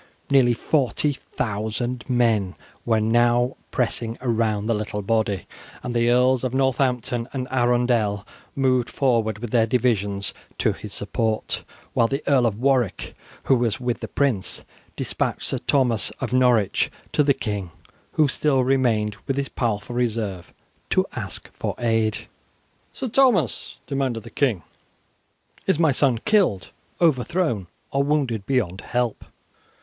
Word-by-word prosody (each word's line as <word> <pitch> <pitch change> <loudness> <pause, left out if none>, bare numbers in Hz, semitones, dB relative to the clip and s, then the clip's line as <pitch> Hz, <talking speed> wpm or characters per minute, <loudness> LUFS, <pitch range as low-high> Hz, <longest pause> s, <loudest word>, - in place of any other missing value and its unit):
Nearly 125 -3 +5
40,000 120 -4 -1
men 115 -6 +2 0.3
were 110 -2 +3
now 120 +3 +3
pressing 115 -2 -1
round 110 -4 0
the 115 - +2
little 105 -1 -3
body, 105 -2 0 0.4
and 120 -1 -4
the 120 0 +3
Earls 125 +1 +3
of 130 0 -1
Northampton 125 -3 0
and 130 -2 -3
Arundel 120 -5 +1 0.3
moved 130 -3 +2
forward 115 -6 +1
with 115 0 -6
their 115 -2 +3
divisions 105 -5 0 0.2
to - - +2
his - - -9
support, 110 -1 -2 0.3
while 115 - +3
the 135 +4 -3
Earl 130 -4 +4
of 105 -3 -2
Warwick, 125 -7 +1 0.3
who 135 - +4
was 115 -4 0
with 125 -1 -2
the - - -5
prince, 135 -9 -1 0.3
despatched - - -2
Sir - - -2
Thomas 125 -6 +2
of - - -3
Norwich 125 -6 +3 0.2
to - - +4
the 140 -2 +3
king, 100 -5 -3 0.4
who 155 - +4
still 135 -1 +1
remained 115 -5 +1
with 135 - -1
his 140 -1 -1
powerful 115 0 -2
reserve, 110 -7 -2 0.4
to - - +3
ask - - -4
for - - -3
aid. 115 -2 0 0.7
"Sir 260 - -4
Thomas," 250 -2 +2
demanded 135 -6 -2
the 115 - -11
king, 115 -11 +1 1.0
"is - - +3
my 160 -2 +4
son 130 -2 +2
killed, 195 - +2 0.3
overthrown, 155 - +1 0.2
or 140 - +2
wounded 140 -8 0
beyond 105 -9 0
help?" 120 -2 -2
120 Hz, 135 wpm, -23 LUFS, 110-130 Hz, 1.0 s, Nearly